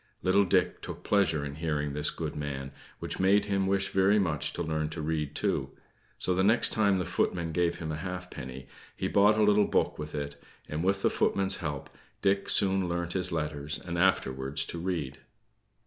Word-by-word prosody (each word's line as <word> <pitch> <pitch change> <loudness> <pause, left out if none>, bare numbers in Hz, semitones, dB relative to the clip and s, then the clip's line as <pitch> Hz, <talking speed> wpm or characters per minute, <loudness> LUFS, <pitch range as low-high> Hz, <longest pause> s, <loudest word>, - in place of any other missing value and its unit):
Little 100 +2 +4
Dick 90 - +1
took - - -8
pleasure 85 -8 +2
in 70 0 -6
hearing 75 -3 -2
this 75 +1 0
good - - -5
man, 70 -2 -4 0.3
which - - -4
made 95 +2 +4
him 100 -1 0
wish 95 0 +1
very 95 +2 +3
much 80 -8 0
to 85 - -3
learn 80 -1 -1
to 80 +1 -7
read 75 -2 -2
too; - - -1 0.5
so 90 - +2
the 95 +1 +1
next 110 +4 +4
time 100 -3 +2
the 90 - -1
footman 85 -2 -1
gave 85 +1 +1
him 80 -3 -4
a 75 - -3
halfpenny, 80 -7 -7 0.3
he - - -2
bought 105 +2 +4
a 110 - +4
little 105 0 +4
book - - 0
with 75 0 -6
it; 70 -1 -5 0.3
and 75 +2 -3
with 95 +1 +1
the - - +3
footman's 95 0 +1
help, 75 -4 -4 0.4
Dick 100 0 +2
soon 95 -2 +3
learnt 85 0 -2
his 90 -1 +1
letters, 75 -2 -2
and 85 -1 -6
afterwards 70 -7 +1
to 85 - -6
read. 85 -6 -3
85 Hz, 195 wpm, -29 LUFS, 75-95 Hz, 0.5 s, Little